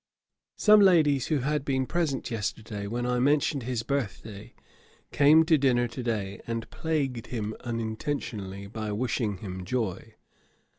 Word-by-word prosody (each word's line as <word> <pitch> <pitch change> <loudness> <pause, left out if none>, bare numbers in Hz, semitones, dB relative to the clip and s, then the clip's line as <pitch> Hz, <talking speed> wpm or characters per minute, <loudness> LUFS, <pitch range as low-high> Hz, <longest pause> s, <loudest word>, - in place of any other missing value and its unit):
Some 215 0 +6
ladies, 155 -9 +4
who 150 -4 +1
had 150 +2 0
been 130 -2 0
present 155 -6 -1
yesterday 105 -2 -4
when 120 +3 -2
I 125 0 0
mentioned 145 +1 +2
his 120 -1 -3
birth 135 -5 -2
day, 105 -1 -11 0.6
came 155 +3 +6
to 160 -2 +4
dinner 125 -3 +3
to 125 - -6
day, 105 -5 -3
and 115 -1 -3
plagued 140 -7 -2
him 110 -2 -3
unintentionally, 110 -4 -4
by 110 +1 -5
wishing 110 -2 -1
him 95 -1 -7
joy. 110 -2 -3
120 Hz, 145 wpm, -27 LUFS, 110-140 Hz, 0.6 s, Some